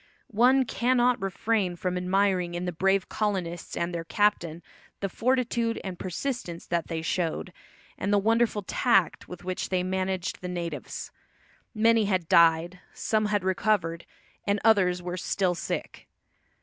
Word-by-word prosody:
One 255 Hz, +5 st, +4 dB
cannot 245 Hz, 0 st, +2 dB
refrain 195 Hz, -1 st, 0 dB
from 180 Hz, +1 st, -2 dB
admiring 180 Hz, -1 st, +1 dB
in 175 Hz, +1 st, -3 dB
the 180 Hz, -, -1 dB
brave 190 Hz, +3 st, +1 dB
colonists 185 Hz, -5 st, -3 dB
and 170 Hz, +1 st, -1 dB
their 170 Hz, -1 st, -3 dB
captain 175 Hz, -3 st, 0 dB, 0.4 s
the 200 Hz, -, -1 dB
fortitude 235 Hz, 0 st, 0 dB
and 185 Hz, -2 st, -6 dB
persistence 185 Hz, -2 st, -4 dB
that 170 Hz, -1 st, -1 dB
they 165 Hz, -1 st, -3 dB
showed, 170 Hz, +1 st, -2 dB, 0.5 s
and 200 Hz, -, -1 dB
the 205 Hz, -, +5 dB
wonderful 225 Hz, 0 st, +2 dB
tact 195 Hz, -3 st, +1 dB
with 180 Hz, -, -9 dB
which 185 Hz, 0 st, -3 dB
they 185 Hz, -1 st, +1 dB
managed 185 Hz, 0 st, -2 dB
the 180 Hz, -, -4 dB
natives. 175 Hz, -2 st, -5 dB, 0.6 s
Many 225 Hz, 0 st, +4 dB
had 185 Hz, -4 st, 0 dB
died, 170 Hz, +2 st, +4 dB, 0.2 s
some 215 Hz, -1 st, 0 dB
had 205 Hz, -3 st, 0 dB
recovered, 185 Hz, -3 st, 0 dB, 0.4 s
and 200 Hz, +1 st, +1 dB
others 185 Hz, -5 st, +3 dB
were 180 Hz, +1 st, -4 dB
still 185 Hz, 0 st, 0 dB
sick. 170 Hz, -, -5 dB
185 Hz, 145 wpm, -27 LUFS, 175-215 Hz, 0.6 s, the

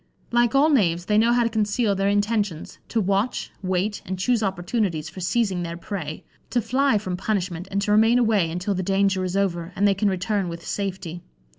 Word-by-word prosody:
Like 240 Hz, +2 st, +2 dB
all 295 Hz, +3 st, +5 dB
knaves, 175 Hz, -, +2 dB
they 210 Hz, +2 st, +3 dB
know 230 Hz, +2 st, +4 dB
how 240 Hz, 0 st, +3 dB
to 230 Hz, -, +1 dB
conceal 215 Hz, 0 st, +1 dB
their 195 Hz, 0 st, +1 dB
intentions, 205 Hz, -4 st, -1 dB
to 230 Hz, -, 0 dB
watch, 200 Hz, +4 st, 0 dB
wait, 190 Hz, +2 st, -1 dB
and 190 Hz, +1 st, -4 dB
choose 235 Hz, +4 st, +1 dB
opportunities 190 Hz, -3 st, -1 dB
for -, -, -10 dB
seizing 190 Hz, -1 st, 0 dB
their 170 Hz, -1 st, -4 dB
prey; 170 Hz, -4 st, -6 dB, 0.3 s
to 245 Hz, -, +1 dB
fly 260 Hz, +1 st, +2 dB
from 185 Hz, -3 st, -3 dB
punishment, 185 Hz, -3 st, -2 dB
and 200 Hz, -, -1 dB
to 205 Hz, -, 0 dB
remain 225 Hz, +3 st, +5 dB
away 215 Hz, -8 st, +2 dB
until 180 Hz, +5 st, -2 dB
the 185 Hz, -, -2 dB
danger 195 Hz, 0 st, +1 dB
is 185 Hz, +1 st, -2 dB
over, 175 Hz, -3 st, -1 dB
and 200 Hz, +1 st, +3 dB
they 200 Hz, -, +4 dB
can 200 Hz, +1 st, +1 dB
return 190 Hz, 0 st, -1 dB
with 170 Hz, 0 st, -8 dB
safety. 185 Hz, -4 st, -4 dB
200 Hz, 200 wpm, -24 LUFS, 180-220 Hz, 0.3 s, all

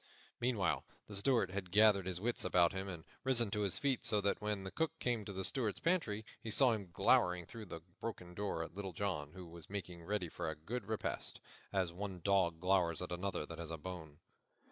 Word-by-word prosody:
Meanwhile 120 Hz, -6 st, +1 dB, 0.2 s
the 105 Hz, -, -10 dB
Steward 100 Hz, -2 st, +3 dB
had 95 Hz, -2 st, -3 dB
gathered 100 Hz, -1 st, +6 dB
his 90 Hz, -2 st, -1 dB
wits 120 Hz, +4 st, 0 dB
about 90 Hz, -1 st, +4 dB
him 95 Hz, +1 st, -3 dB
and 85 Hz, -4 st, -6 dB, 0.2 s
risen 120 Hz, -5 st, +2 dB
to 105 Hz, -, 0 dB
his 100 Hz, -3 st, +3 dB
feet, 135 Hz, -3 st, +1 dB
so 105 Hz, -, +4 dB
that 100 Hz, +1 st, +1 dB
when 105 Hz, -2 st, -1 dB
the 95 Hz, -, -5 dB
Cook 160 Hz, +5 st, -1 dB
came 120 Hz, -3 st, 0 dB
to 100 Hz, -, -5 dB
the 95 Hz, -1 st, -3 dB
Steward's 115 Hz, -6 st, 0 dB
pantry 140 Hz, -, +1 dB, 0.2 s
he 115 Hz, -, -5 dB
saw 125 Hz, +3 st, +6 dB
him 100 Hz, -5 st, -2 dB
glowering 90 Hz, 0 st, +4 dB
through 110 Hz, +5 st, -8 dB
the 85 Hz, -2 st, -6 dB, 0.2 s
broken 90 Hz, -6 st, -5 dB
door 95 Hz, -4 st, -1 dB
at 80 Hz, -, -8 dB
Little 95 Hz, -1 st, -5 dB
John, 80 Hz, -6 st, -2 dB
who 90 Hz, -1 st, -8 dB
was 85 Hz, -1 st, -9 dB
making 90 Hz, -4 st, -5 dB
ready 100 Hz, 0 st, -1 dB
for 80 Hz, -, -3 dB
a 80 Hz, -, -3 dB
good 115 Hz, +11 st, -5 dB
repast, 110 Hz, -1 st, -2 dB, 0.3 s
as 95 Hz, -3 st, +1 dB
one 95 Hz, 0 st, -4 dB
dog 95 Hz, -5 st, +3 dB
glowers 90 Hz, -2 st, +3 dB
at 90 Hz, -, -6 dB
another 90 Hz, -2 st, -2 dB
that 80 Hz, +1 st, -8 dB
has 85 Hz, -2 st, -5 dB
a 80 Hz, -, -3 dB
bone. 80 Hz, -3 st, -7 dB
95 Hz, 215 wpm, -37 LUFS, 90-105 Hz, 0.3 s, gathered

